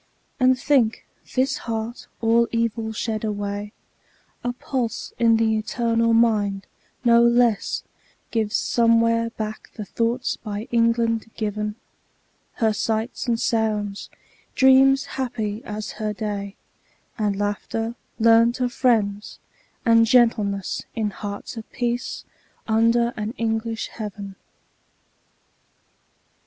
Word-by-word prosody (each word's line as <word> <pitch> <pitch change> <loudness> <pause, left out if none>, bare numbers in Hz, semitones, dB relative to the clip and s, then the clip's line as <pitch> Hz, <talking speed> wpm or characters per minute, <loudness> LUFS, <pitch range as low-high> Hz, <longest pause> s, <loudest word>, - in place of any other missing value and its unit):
And 255 0 +4
think, 255 -5 +2 0.3
this 270 +1 +2
heart, 225 +1 -4
all 230 +1 +4
evil 230 -1 -1
shed 220 0 -3
away, 205 -1 -3 0.7
A 245 - 0
pulse 245 -1 -3
in 230 -1 +5
the 220 -1 +2
eternal 230 +1 +1
mind, 210 -4 +2 0.4
no 235 0 +6
less 235 -2 +2 0.5
Gives 220 -1 0
somewhere 230 -1 +3
back 215 -1 -6
the 210 - -6
thoughts 235 +4 -1
by 210 +1 -6
England 230 -1 +2
given; 210 -1 -2 0.8
Her 220 -2 +1
sights 225 +4 -2
and 230 -1 +1
sounds; 210 -3 -1 0.5
dreams 265 +1 +5
happy 225 -4 -3
as 210 0 -5
her 215 -1 -1
day; 205 -2 -4 0.6
And 210 -2 +1
laughter, 205 +3 -2 0.2
learnt 230 +2 +4
of 250 -1 0
friends; 210 -5 +1 0.5
and 230 -1 +5
gentleness, 215 -5 +2
In 215 -2 -1
hearts 205 +3 -6
at 220 - -12
peace, 240 -1 -3 0.4
under 230 +2 +3
an 215 +3 -4
English 225 0 -2
heaven. 205 -3 -7
225 Hz, 110 wpm, -23 LUFS, 210-235 Hz, 0.8 s, no